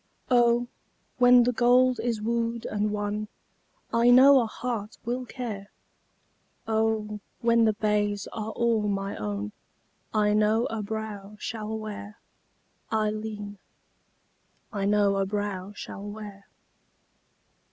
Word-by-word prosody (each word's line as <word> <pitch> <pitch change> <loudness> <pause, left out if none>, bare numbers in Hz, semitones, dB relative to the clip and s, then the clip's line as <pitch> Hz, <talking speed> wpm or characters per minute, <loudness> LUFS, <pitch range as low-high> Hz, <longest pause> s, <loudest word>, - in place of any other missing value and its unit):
Oh! 240 0 +4 0.5
when 245 0 +7
the 245 - +2
gold 250 0 +4
is 225 -2 -2
wooed 230 0 -1
and 210 0 -1
won, 210 0 -2 0.7
I 230 +1 +4
know 265 +3 +8
a 230 - -1
heart 220 -2 -4
will 245 +1 -3
care! 220 -7 -6 1.0
Oh! 220 -1 0 0.2
when 235 -1 +4
the 220 - +3
bays 205 -1 0
are 220 -1 -4
all 225 -2 +1
my 195 -1 -2
own, 105 0 -4 0.6
I 210 -1 +2
know 215 +2 +3
a 225 -1 -2
brow 210 -1 -5
shall 220 0 -4
wear, 210 -1 -7 0.7
Ailleen, 215 -2 -2 1.1
I 200 -2 -1
know 205 -1 +3
a 195 - +1
brow 205 -1 -3
shall 200 - -8
wear. 205 -1 -9
215 Hz, 120 wpm, -27 LUFS, 205-230 Hz, 1.1 s, know